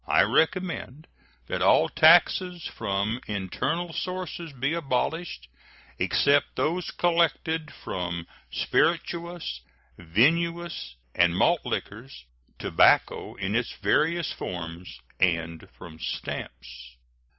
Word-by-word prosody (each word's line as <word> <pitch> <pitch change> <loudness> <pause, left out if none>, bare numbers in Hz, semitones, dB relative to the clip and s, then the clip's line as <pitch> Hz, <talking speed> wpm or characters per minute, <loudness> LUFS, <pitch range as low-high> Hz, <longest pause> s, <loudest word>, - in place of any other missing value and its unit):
I - - +5
recommend 160 -4 0 0.4
that - - -3
all - - +5
taxes 175 +1 +4
from 110 +3 -2
internal 155 - -2
sources 180 -3 -4
be 140 +3 -2
abolished, 160 - -2 0.5
except 140 0 +2
those 175 +3 -1
collected 165 -2 0
from 85 -2 -5 0.2
spirituous, 170 0 -1 0.4
vinous, 155 - +1 0.2
and 85 0 +3
malt 170 - +3
liquors, 110 - -5 0.3
tobacco - - +3
in 95 0 -3
its 120 0 -1
various 160 - +1
forms, 85 0 -7 0.2
and 85 -2 0
from 80 -3 -11
stamps. - - -6
135 Hz, 95 wpm, -26 LUFS, -, 0.5 s, I